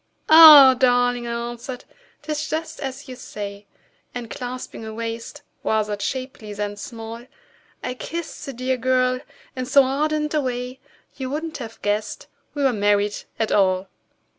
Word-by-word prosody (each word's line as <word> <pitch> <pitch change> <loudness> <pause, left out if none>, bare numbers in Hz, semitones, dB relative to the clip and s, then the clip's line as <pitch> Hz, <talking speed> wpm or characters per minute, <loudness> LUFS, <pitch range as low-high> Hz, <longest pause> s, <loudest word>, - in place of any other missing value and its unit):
"Ah! 305 -4 +11
darling," 245 -1 +2
I 235 0 -3
answered, 245 +1 -8 0.4
"'tis 305 0 -3
just 320 +1 -4
as 270 +1 -6
you 255 - -8
say;" 205 -4 -8 0.5
And 240 -3 -6
clasping 250 -2 -6
a 220 - -6
waist 230 +5 -6 0.2
rather 215 -1 0
shapely 255 -2 -5
than 205 0 -4
small, 230 +2 -8 0.6
I 250 - -3
kissed 335 +6 -6
the 275 - -5
dear 255 +1 -1
girl 255 0 +1 0.4
in 255 -1 -4
so 280 +1 +6
ardent 300 +3 -1
a 305 - +2
way 250 0 -4 0.4
You 260 -2 -4
wouldn't 310 +3 -4
have 225 -3 -8
guessed 210 +1 -2 0.3
we 285 - -1
were 265 -2 +3
married 205 -1 +1 0.2
at 220 - -1
all! 190 -1 +2
250 Hz, 150 wpm, -22 LUFS, 225-270 Hz, 0.6 s, Ah